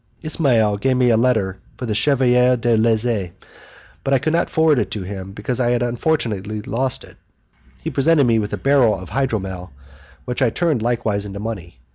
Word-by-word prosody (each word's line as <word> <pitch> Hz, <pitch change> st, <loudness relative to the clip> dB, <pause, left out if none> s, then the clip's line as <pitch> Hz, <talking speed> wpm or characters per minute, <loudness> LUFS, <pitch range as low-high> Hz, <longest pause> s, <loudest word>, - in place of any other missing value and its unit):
Ismail 120 Hz, -10 st, +2 dB
gave 130 Hz, +4 st, +1 dB
me 125 Hz, -1 st, +3 dB
a -, -, +4 dB
letter 110 Hz, -5 st, +1 dB, 0.2 s
for 125 Hz, -, -5 dB
the 110 Hz, -, -1 dB
Chevalier 125 Hz, 0 st, +3 dB
de 120 Hz, 0 st, +1 dB
Lezze, 110 Hz, -4 st, +1 dB, 0.7 s
but 135 Hz, -, +2 dB
I -, -, +5 dB
could 155 Hz, +4 st, -1 dB
not 170 Hz, -, +1 dB
forward 160 Hz, -4 st, +3 dB
it -, -, -1 dB
to 105 Hz, -, -4 dB
him 95 Hz, 0 st, -7 dB
because 105 Hz, +5 st, -3 dB
I 120 Hz, -1 st, +2 dB
unfortunately 120 Hz, -4 st, -1 dB
lost 130 Hz, +5 st, -2 dB
it; -, -, -16 dB, 0.7 s
he -, -, -3 dB
presented 150 Hz, +1 st, +3 dB
me 115 Hz, -2 st, +3 dB
with 105 Hz, -1 st, -3 dB
a -, -, -2 dB
barrel 130 Hz, -8 st, +3 dB
of 95 Hz, -, -10 dB
hydromel, 95 Hz, -8 st, -2 dB, 0.6 s
which 125 Hz, +2 st, -3 dB
I 130 Hz, -, +4 dB
turned 155 Hz, -1 st, 0 dB
likewise 115 Hz, -3 st, -1 dB
into 100 Hz, -1 st, -7 dB
money. 95 Hz, -, -7 dB
120 Hz, 185 wpm, -20 LUFS, 105-130 Hz, 0.7 s, I